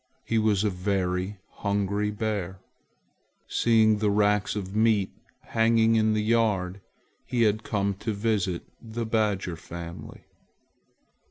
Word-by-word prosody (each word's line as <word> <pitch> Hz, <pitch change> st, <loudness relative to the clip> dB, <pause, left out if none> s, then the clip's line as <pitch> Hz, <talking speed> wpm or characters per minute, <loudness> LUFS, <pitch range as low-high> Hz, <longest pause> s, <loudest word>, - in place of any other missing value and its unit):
He 115 Hz, -, +1 dB
was 105 Hz, -2 st, +2 dB
a 105 Hz, -, +1 dB
very 90 Hz, +1 st, -1 dB, 0.2 s
hungry 100 Hz, +1 st, 0 dB
bear. 105 Hz, -3 st, -3 dB, 0.9 s
Seeing 110 Hz, -2 st, +3 dB
the 105 Hz, -1 st, +2 dB
racks 105 Hz, 0 st, +2 dB
of 100 Hz, -3 st, -4 dB
red 100 Hz, -, -9 dB
meat 110 Hz, -3 st, +3 dB, 0.3 s
hanging 115 Hz, 0 st, +3 dB
in 110 Hz, -1 st, +3 dB
the 105 Hz, -, 0 dB
yard, 105 Hz, -4 st, +1 dB, 0.5 s
he 120 Hz, -2 st, +1 dB
had 110 Hz, 0 st, +2 dB
come 100 Hz, -2 st, -1 dB
to 110 Hz, -, -2 dB
visit 100 Hz, -4 st, -1 dB, 0.2 s
the 115 Hz, 0 st, -4 dB
badger 105 Hz, -5 st, 0 dB
family. 85 Hz, +1 st, -9 dB
105 Hz, 125 wpm, -27 LUFS, 95-110 Hz, 0.9 s, Seeing